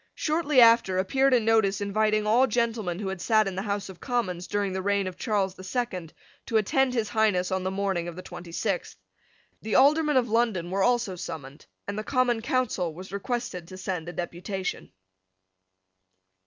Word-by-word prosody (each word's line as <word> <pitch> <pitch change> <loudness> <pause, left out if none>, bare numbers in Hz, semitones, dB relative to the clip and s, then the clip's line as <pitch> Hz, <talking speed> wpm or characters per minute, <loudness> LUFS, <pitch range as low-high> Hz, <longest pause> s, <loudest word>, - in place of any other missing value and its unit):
Shortly 305 -3 +1
after 230 -5 +5
appeared 265 +9 +2
a 250 - +5
notice 220 -3 +2
inviting 215 +1 +1
all 240 +5 +4
gentlemen 225 -6 -1
who 195 -1 -3
had 190 -2 -5
sate 215 +2 +3
in 195 - -3
the 185 - -3
House 200 -1 -3
of 190 -2 -11
Commons 185 -8 -2
during 205 -1 -1
the 190 - -2
reign 200 0 +1
of 185 -1 -5
Charles 200 -4 -1
the 185 - -12
Second 185 -6 -3 0.4
to 225 - +2
attend 255 +5 +2
His 220 -3 0
Highness 205 -4 +1
on 190 0 0
the 185 - -1
morning 190 -3 -1
of 170 - -6
the 185 - -8
twenty 175 -1 -9
sixth. - - -2 0.7
The 220 - -2
Aldermen 300 +1 +4
of 245 -2 +2
London 215 -7 0
were 195 +1 0
also 235 -4 +2
summoned; 155 -5 -8 0.2
and 200 +1 -3
the - - -4
Common 245 -2 +1
Council 240 - 0
was 185 +3 -10
requested 200 -4 -4
to 185 - -10
send 180 -3 -4
a - - -7
deputation. 180 +2 -4
200 Hz, 185 wpm, -27 LUFS, 185-235 Hz, 0.7 s, after